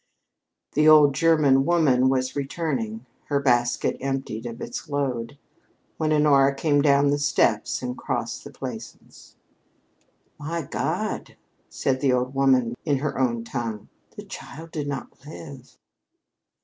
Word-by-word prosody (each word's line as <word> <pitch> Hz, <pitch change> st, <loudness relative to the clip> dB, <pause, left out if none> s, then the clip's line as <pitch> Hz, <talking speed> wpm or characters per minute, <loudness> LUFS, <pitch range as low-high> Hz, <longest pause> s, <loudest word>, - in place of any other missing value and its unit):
The 150 Hz, +1 st, +4 dB
old 150 Hz, -2 st, +7 dB
German 145 Hz, -3 st, +4 dB
woman 140 Hz, -6 st, +3 dB
was 130 Hz, -1 st, 0 dB
returning, 135 Hz, -6 st, -3 dB, 0.2 s
her 140 Hz, -1 st, 0 dB
basket 120 Hz, -3 st, +1 dB
emptied 135 Hz, -4 st, -3 dB
of 115 Hz, 0 st, -8 dB
its -, -, -6 dB
load, 135 Hz, -3 st, -2 dB, 0.6 s
when 155 Hz, -1 st, 0 dB
Honora 140 Hz, -2 st, +4 dB
came 145 Hz, 0 st, +2 dB
down 140 Hz, -1 st, +4 dB
the 145 Hz, -, 0 dB
steps 130 Hz, -6 st, +1 dB
and 125 Hz, 0 st, -3 dB
crossed -, -, -4 dB
the -, -, -9 dB
Plaisance. -, -, -10 dB, 1.0 s
"My 165 Hz, +3 st, -3 dB
God," -, -, -3 dB, 0.3 s
said 130 Hz, -1 st, -1 dB
the 135 Hz, -3 st, +3 dB
old 125 Hz, +1 st, 0 dB
woman 130 Hz, -3 st, +3 dB
in 145 Hz, -3 st, +1 dB
her 140 Hz, 0 st, -3 dB
own 120 Hz, -3 st, 0 dB
tongue, 115 Hz, -3 st, -5 dB, 0.3 s
"the -, -, -8 dB
child 165 Hz, +3 st, -10 dB
did 150 Hz, -3 st, -4 dB
not 135 Hz, -2 st, -6 dB
live!" 140 Hz, -5 st, -11 dB
135 Hz, 135 wpm, -24 LUFS, 125-145 Hz, 1.0 s, old